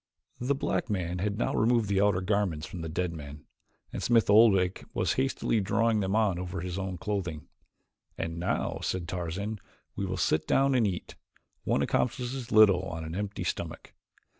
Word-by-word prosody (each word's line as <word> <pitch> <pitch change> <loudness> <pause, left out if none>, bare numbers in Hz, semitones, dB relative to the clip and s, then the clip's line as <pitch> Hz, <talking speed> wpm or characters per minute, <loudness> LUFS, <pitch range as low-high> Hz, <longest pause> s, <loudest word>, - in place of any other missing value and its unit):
The 130 +3 0
black 135 - -1
man 90 -3 -2
had 100 +2 -1
now 120 - 0
removed 115 -1 +2
the 100 0 +2
outer 100 -2 +3
garments 95 -5 0
from 90 - -7
the 80 - -4
dead 85 +1 -2
man, 75 -1 -9 0.5
and - - -4
Smith 115 -3 +3
Oldwick 100 -4 +5
was - - +1
hastily 130 -4 0
drawing 110 +3 +2
them 95 0 0
on 105 -5 +2
over 90 -2 -4
his 90 +1 -4
own 95 -1 -4
clothing. 90 -6 -3 0.7
"And 85 0 -3
now," 85 - -1
said 90 -2 -2
Tarzan, 95 +5 -3 0.4
"we 100 - -2
will 95 0 -3
sit 80 -2 +1
down 135 0 +3
and 120 -4 +3
eat. 90 -3 -4 0.5
One - - +2
accomplishes 125 0 -1
little 105 -4 +6
on 80 -4 -5
an 80 0 -6
empty 100 +2 -3
stomach." - - -5
95 Hz, 175 wpm, -29 LUFS, 90-110 Hz, 0.7 s, little